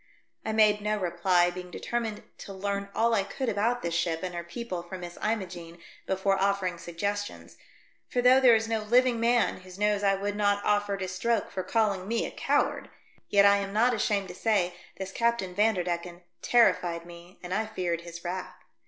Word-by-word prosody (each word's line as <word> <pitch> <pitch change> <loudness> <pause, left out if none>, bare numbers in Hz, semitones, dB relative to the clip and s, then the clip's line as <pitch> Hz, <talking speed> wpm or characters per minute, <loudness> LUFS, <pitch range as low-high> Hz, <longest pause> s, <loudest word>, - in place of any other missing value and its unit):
I 220 - -2
made 215 -1 +4
no 210 +1 0
reply, 175 -1 +2
being 180 0 -8
determined 225 +2 -3 0.2
to 200 - -8
learn 200 +1 -3
all 230 +1 +2
I 210 - +3
could 245 +6 -3
about 230 +4 0
this 170 -1 -2
ship 165 0 -1
and 180 -1 -3
her 170 0 -4
people 180 +1 -5
from 180 +2 -8
Miss 175 0 -7
Imogene 180 -6 -3 0.3
before 190 0 +1
offering 195 -3 0
sugges 200 +5 -2
tions, - - -11 0.5
for 250 - -1
though 250 +2 +6
there 250 -3 +7
is 225 0 0
no 225 -1 0
living 240 +2 +3
man 235 0 +2
whose 185 0 -13
nose 210 0 +1
I 195 -1 +3
would 200 +1 -3
not 205 -1 +1
offer 205 -1 +1
to 190 -1 -4
stroke 205 +4 -1
for 190 - -3
calling 200 -3 0
me 230 +1 0
a - - -5
coward, - - 0 0.4
yet 200 0 +5
I 200 0 +6
am 200 0 -4
not 240 +4 +3
ashamed 205 -3 0
to - - -7
say 195 -6 +1 0.2
this 190 0 -5
Captain 235 -5 0
Vanderdecken 180 -4 0 0.2
terrified 175 -8 +3
me 175 +1 -13
and 180 +1 -4
I 215 +2 0
feared 175 -6 -2
his 170 0 -10
wrath. 180 +1 -5
200 Hz, 195 wpm, -28 LUFS, 180-220 Hz, 0.5 s, there